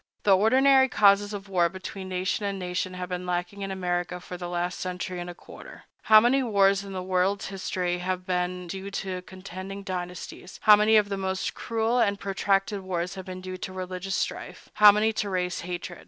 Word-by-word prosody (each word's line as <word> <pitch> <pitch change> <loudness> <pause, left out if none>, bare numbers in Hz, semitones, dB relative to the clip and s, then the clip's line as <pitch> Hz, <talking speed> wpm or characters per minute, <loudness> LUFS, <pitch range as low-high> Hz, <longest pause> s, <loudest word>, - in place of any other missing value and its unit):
The 200 -2 +6
ordinary 265 +6 +5
causes 205 -2 +4
of 200 -1 -6
war 175 -3 +2
between 190 +1 -7
nation 185 +2 -1
and 200 -1 -2
nation 180 0 -3
have 180 0 -5
been 180 0 -4
lacking 180 +3 -3
in 195 - -3
America 180 -1 -2
for 180 - -8
the 175 0 -6
last 175 +1 -2
century 180 0 -4
and 175 0 -5
a 175 - -8
quarter. - - -13 0.2
How 215 0 +9
many 245 +5 +3
wars 200 -4 +3
in 200 - -9
the 185 -1 -4
world's 185 +2 0
history 180 -2 -2
have 180 0 -3
been 180 -1 -2
due 190 +3 -6
to 190 -2 -4
contending 190 +1 -8
dynasties; 180 0 -6
how 210 - +9
many 210 +1 +4
of 210 -1 +4
the 200 - -2
most 190 0 -2
cruel 230 +1 -1
and 200 -3 +2
protracted 195 +1 0
wars 180 -1 -3
have 190 -1 -8
been 185 0 -7
due 185 0 -6
to 185 - -6
religious 185 +1 -4
strife; - - -4
how 210 -1 +8
many 215 +2 +1
to 210 -1 -2
race 180 -1 -1
hatred! 175 0 -6
190 Hz, 200 wpm, -26 LUFS, 180-200 Hz, 0.2 s, How